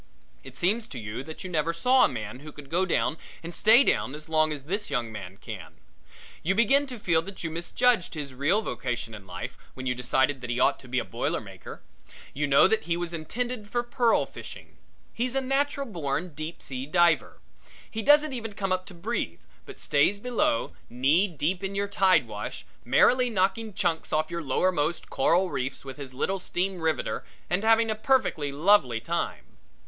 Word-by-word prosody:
It 135 0 -10
seems 215 - +1
to 135 - -9
you 110 +3 -5
that 160 0 -8
you 185 - -5
never 165 0 +1
saw 250 +10 +4
a - - +1
man 105 +3 -6
who 150 +2 -10
could 145 -1 -13
go 185 +3 +2
down 165 -2 0 0.2
and 170 +1 -6
stay 220 +8 +6
down 135 - +1
as 150 0 -9
long 155 -1 +2
as 145 -3 -5
this 200 +8 -3
young 120 -5 -1
man 95 -3 -8
can. - - -9 0.7
You 190 +4 +1
begin 270 +6 +4
to 250 -2 -7
feel 170 -6 +2
that 195 +3 -9
you 165 - -2
misjudged 180 +5 +1
his 145 -3 -5
real 155 +12 +1
vocation 120 - -3
in 100 -3 -10
life - - -7 0.2
when 130 - -7
you 125 - +1
decided 130 +2 +1
that 125 - -6
he 120 +1 -1
ought 140 +2 +3
to 130 - -14
be 125 +1 -2
a - - 0
boiler - - -2
maker. - - -11 0.5
You 145 +1 -1
know 140 +4 +6
that 220 +2 0
he 170 0 0
was 175 -1 -3
intended 220 +7 -3
for 240 +2 0
pearl 240 -1 +2
fishing. - - -11 0.4
He's 250 +2 -1
a - - +3
natural 275 +1 0
born 175 - -3
deep 155 +3 -6
sea 130 0 -5
diver. 170 0 +3 0.5
He 225 - -3
doesn't 295 +4 +5
even 230 -3 -4
have 205 - -15
to - - -13
come 195 -2 -1
up 185 0 -1
to 185 - -10
breathe, 170 - -3 0.3
but - - -10
stays 145 +8 +2
below, 205 - 0 0.2
knee 140 +11 +3
deep 175 +3 -2
in 195 +1 -3
your 200 0 0
tide 195 -2 +3
wash, - - -6 0.2
merrily 250 0 +4
knocking 215 +2 0
chunks 175 -5 -1
off 155 +1 0
your 170 0 -3
lowermost 155 +2 0
coral 180 +2 +2
reefs 130 +2 -3
with 135 0 -8
his 140 -3 -7
little 195 +8 -1
steam 185 +1 -2
riveter 160 -1 -1 0.3
and 180 +4 +1
having 225 0 +4
a - - +2
perfectly 215 - +1
lovely 145 - +3
time. 115 - -3
170 Hz, 200 wpm, -27 LUFS, 140-210 Hz, 0.7 s, stay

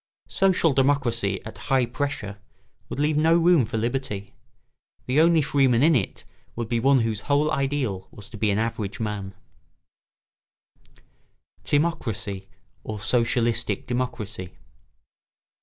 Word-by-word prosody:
Social 185 -5 +2
democracy 125 -7 +1
at 110 - -9
high 135 -3 +3
pressure 120 -5 -4 0.5
would - - -5
leave 150 +1 +1
no 165 +2 +4
room 170 -6 +4
for 115 +1 -4
liberty. 115 -3 -3 0.7
The 135 +5 +3
only 165 -1 +4
freeman 135 -3 +3
in 160 0 +5
it 110 -7 -2 0.3
would 115 -1 -3
be 115 0 0
one 135 +1 +4
whose 110 -2 -1
whole 145 +2 +3
ideal 135 -10 -1
was 105 0 -12
to 110 - -10
be 110 - +2
an 100 - +1
average 110 -3 -2
man. 105 -3 -4 2.3
[Sidenote: 165 +3 +1
Timocracy 100 -3 -5 0.4
or 110 -1 -5
socialistic 115 +3 +1
democracy. 110 -7 -4
120 Hz, 125 wpm, -25 LUFS, 110-145 Hz, 2.3 s, in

